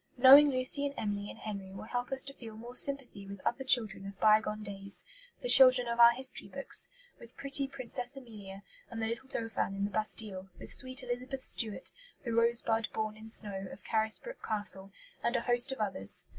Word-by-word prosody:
Knowing 275 +4 +9
Lucy 255 +2 0
and 280 - -8
Emily 205 -1 -3
and - - -10
Henry 200 -3 -7
will 190 - -9
help 245 +3 -4
us 270 0 +3
to 275 - -8
feel 225 -5 -11
more 235 +3 -10
sympathy 255 -9 +1
with 200 0 -9
other 265 - -1
children 225 -6 +1
of 195 -1 -11
bygone 215 0 +2
days, 200 -1 -2 0.4
the - - -2
children 255 - +6
of 235 0 -3
our 235 0 +9
history 255 +2 -3
books - - 0 0.3
with 235 - -14
pretty 275 0 +2
Princess 255 0 -7
Amelia, 205 -6 -11 0.3
and 230 - -7
the 225 - -1
little 235 +4 -5
Dauphin 225 -5 -3
in 200 - -3
the 205 - -5
Bastille, 205 -2 -3
with - - -3
sweet 255 -1 +2
Elizabeth 255 +2 -5
Stuart, 220 -4 0 0.3
the 235 -3 -4
"rose 235 +1 +2
bud 225 0 0
born 215 -1 -3
in 220 +1 -12
snow" 195 -3 -2
of - - -12
Carisbrook 220 - 0
Castle, 205 -2 -1 0.3
and 235 +1 0
a - - -2
host 245 +2 +1
of 265 - -5
others. 190 - +2
230 Hz, 200 wpm, -31 LUFS, 210-255 Hz, 0.4 s, Knowing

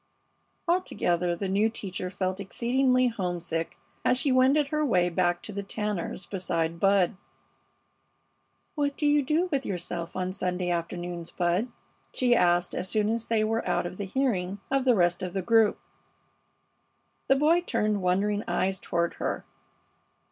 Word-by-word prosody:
Altogether 180 - +1
the 195 +3 -3
new 200 +4 +2
teacher 185 -4 -5
felt 185 0 -2
exceedingly 255 +5 +2
homesick 175 -6 -3 0.3
as 250 - +3
she 270 +1 +1
wended 270 +3 +4
her 305 0 0
way 180 -10 +2
back 175 0 0
to - - -6
the 200 - -3
Tanners' 200 -2 -3
beside 170 -3 -2
Bud. 195 0 +3 1.6
"What 285 -2 -1
do 300 - -1
you 290 0 +4
do 305 +6 +1
with 275 -2 0
yourself 175 -3 -4
on 185 0 -2
Sunday 180 -2 -1
afternoons, 175 0 -3
Bud?" 180 +6 0 0.5
she 245 -1 +4
asked, 175 -3 +2
as 185 - -2
soon 210 -1 +1
as 230 0 -1
they 225 -2 +2
were 225 +1 0
out - - +1
of 180 +2 -6
hearing 200 -3 -1
of 270 -1 +1
the 250 -2 +5
rest 175 -1 +2
of 180 -1 -4
the 190 -1 -2
group. 225 0 +4 1.5
The 270 - +5
boy 315 +5 +4
turned 215 - 0
wondering 200 +3 +1
eyes 190 0 0
toward 170 0 -1
her. - - -2
200 Hz, 150 wpm, -27 LUFS, 180-250 Hz, 1.6 s, the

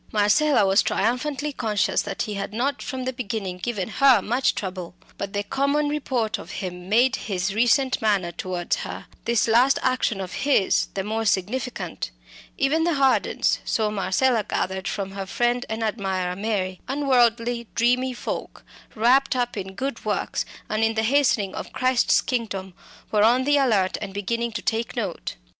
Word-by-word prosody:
Marcella 215 +4 +3
was 195 +2 +4
triumphantly 270 +6 -1
conscious 210 -6 0
that - - -3
he 210 - -4
had 200 +1 -4
not 275 +4 -1
from 260 -2 -4
the 260 - -2
beginning 205 -7 -4
given 205 -3 -2
her 260 0 +5
much 245 +7 +1
trouble. 185 -3 -5 0.2
But 200 0 -4
the 205 0 -1
common 280 +6 0
report 245 -7 -1
of 175 - -9
him 180 -1 -6
made 250 +5 +4
his 195 -1 -2
recent 245 +4 +2
manner 200 -5 +1
towards 175 0 -2
her, - - -6 0.2
this 235 +1 +2
last 245 +4 +4
action 255 -5 +1
of 185 -2 -5
his, 270 -8 +2
the 195 - -1
more 220 +2 -2
significant. 210 -1 -2 0.5
Even 310 +4 +2
the 340 -1 +1
Hardens 270 -2 +2
so 215 -2 0
Marcella 215 +4 +1
gathered 190 0 -2
from 195 -2 -3
her 195 -1 -6
friend 240 +4 0
and 220 +1 -2
admirer 190 -4 -1
Mary 195 -3 -2
unworldly 245 -4 +2
dreamy 250 +2 +2
folk, - - -5 0.3
wrapt 260 +5 +3
up 245 -1 -1
in 190 -2 -6
good 270 +4 -4
works, - - -1 0.2
and 215 +1 0
in 225 0 +2
the 220 - +1
hastening 235 -6 +2
of - - -7
Christ's 255 -1 +3
kingdom, 200 -7 -3 0.4
were 210 - +3
on 245 +4 +4
the 290 +2 +3
alert 215 -9 +2
and 200 -2 -6
beginning 230 +4 -2
to 210 - -4
take 225 +1 -1
note. 205 -8 -4
225 Hz, 165 wpm, -24 LUFS, 195-255 Hz, 0.5 s, her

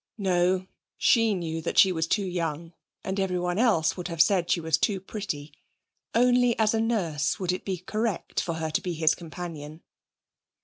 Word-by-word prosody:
No, 185 -2 +1 0.3
she 225 -3 +3
knew 165 -2 -3
that 165 - -4
she 190 - +7
was 160 -2 -1
too 200 +3 +1
young, 165 -2 -3 0.3
and 190 +1 -3
everyone 180 -1 -1
else 185 -10 +3
would 180 -2 -5
have 165 -2 -6
said 175 0 +3
she - - +2
was 160 -2 +1
too 195 +1 +1
pretty. 180 -7 -6 0.6
Only 245 0 +4
as 220 -1 +2
a 220 - +1
nurse 170 -11 0
would 180 -2 0
it 185 - -4
be 190 -2 -3
correct 215 +3 -2
for 170 - -3
her 160 -1 -3
to - - 0
be 180 -2 -3
his 160 0 +3
companion. 160 -2 -8
180 Hz, 180 wpm, -26 LUFS, 165-200 Hz, 0.6 s, she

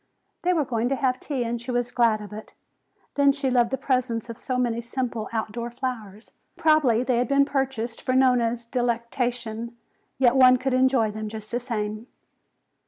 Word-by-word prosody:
They 360 - +2
were 320 -5 +1
going 235 -1 -1
to 275 - +1
have 255 -1 0
tea 270 -5 -2
and 235 0 -3
she 240 - -10
was 245 0 -1
glad 230 -3 +2
of 210 0 -9
it. 215 +1 -10 0.6
Then 280 -1 +4
she 275 -2 -1
loved 240 -2 +3
the 265 - -1
presence 245 -3 -1
of 230 - -10
so 255 -2 -2
many 235 -2 0
simple 235 -2 -4
outdoor 230 +1 -3
flowers. 240 -4 -6 0.3
Probably 310 -8 +3
they 255 -2 +1
had 245 - +1
been 280 0 +4
purchased 265 -5 -2
for 255 - -1
Nona's 240 -3 +2
delectation, 235 -1 -2 0.4
yet 255 -1 +4
one 255 -1 +7
could 265 +1 -2
enjoy 255 -4 +3
them 215 0 -5
just 215 0 -9
the 240 - 0
same. 215 -2 -4
245 Hz, 180 wpm, -25 LUFS, 230-260 Hz, 0.6 s, one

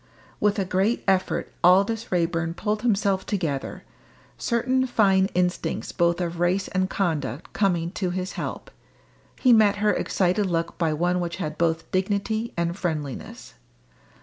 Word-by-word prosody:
With 210 0 +2
a 195 - 0
great 190 +6 0
effort 190 -1 0
Aldous 200 +6 +3
Raeburn 170 -1 0
pulled 210 +1 -2
himself 200 -4 +1
together, 160 -9 -3 0.5
certain 255 +2 0
fine 195 -5 +3
instincts 180 0 -1
both 170 -1 +1
of 170 -1 -3
race 180 +2 +1
and 185 -1 0
conduct 155 -6 -2
coming 175 -4 +1
to 185 -2 -2
his 185 +1 -3
help. - - -6 0.7
He 250 -2 +5
met 215 -3 +5
her 210 0 +2
excited 190 +2 +1
look 170 -1 -1
by 165 -2 +2
one 175 +4 +1
which 170 -1 -3
had 155 -5 -4
both 165 -1 -1
dignity 205 +4 -1
and 170 0 0
friendliness. 155 -8 -5
185 Hz, 145 wpm, -25 LUFS, 170-205 Hz, 0.7 s, He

